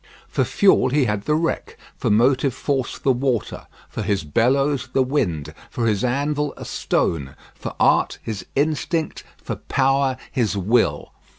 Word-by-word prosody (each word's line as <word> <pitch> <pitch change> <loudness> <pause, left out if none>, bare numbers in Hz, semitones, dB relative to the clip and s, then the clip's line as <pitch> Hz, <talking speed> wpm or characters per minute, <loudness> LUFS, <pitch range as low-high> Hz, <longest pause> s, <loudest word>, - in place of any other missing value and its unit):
For - - 0
fuel 195 -9 +3
he 140 0 +2
had 105 -3 -2
the 150 - +2
wreck; 165 +1 -2 0.2
for - - -2
motive 130 +4 +3
force 135 -4 -2
the 135 - +2
water; 125 -3 -1 0.2
for - - -5
his 100 -5 0
bellows 130 - +1
the 135 - +3
wind; 90 - -1 0.2
for 120 - -2
his 105 -3 +1
anvil 145 +3 0
a - - -8
stone; 70 -5 -1 0.2
for - - -7
art - - +3
his 110 -3 -4
instinct; 155 +3 -1 0.2
for - - -4
power 135 -1 +1
his 115 -6 0
will. 110 +5 +1
130 Hz, 155 wpm, -22 LUFS, 110-140 Hz, 0.2 s, fuel